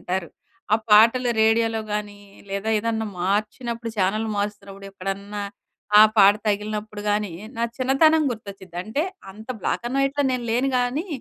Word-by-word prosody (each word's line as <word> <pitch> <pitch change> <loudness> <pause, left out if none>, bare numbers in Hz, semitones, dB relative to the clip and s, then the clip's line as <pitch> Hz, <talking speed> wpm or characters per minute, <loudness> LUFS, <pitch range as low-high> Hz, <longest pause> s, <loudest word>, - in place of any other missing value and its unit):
వింటారు. 180 -1 -3 0.5
ఆ - - +5
పాటలు 230 +4 +6
రేడియోలో 225 0 +2
గాని, 210 -1 -4 0.3
లేదా 200 +2 -3
ఏదన్నా 220 0 -2
మార్చినప్పుడు 225 +5 -2
ఛానెల్ 210 +3 +1
మారుస్తున్నప్పుడు, 200 -1 -5
ఎక్కడన్నా, 200 +2 -5 0.6
ఆ - - +10 0.2
పాట 200 0 +7
తగిలినప్పుడు 210 0 -2
గానీ, 205 -3 -1 0.2
నా 230 - 0
చిన్నతనం 310 +5 +4
గుర్తొచ్చిద్ది. 200 -5 -10
అంటే, 255 +9 -1 0.3
అంత 215 +4 -13
బ్లాక్ - - -1
అండ్ 265 +3 -2
వైట్‌లో 275 +1 +1
నేను 250 -1 -2
లేను 255 +3 +1
GAనీ, 250 +8 -1
215 Hz, 140 wpm, -23 LUFS, 200-240 Hz, 0.6 s, ఆ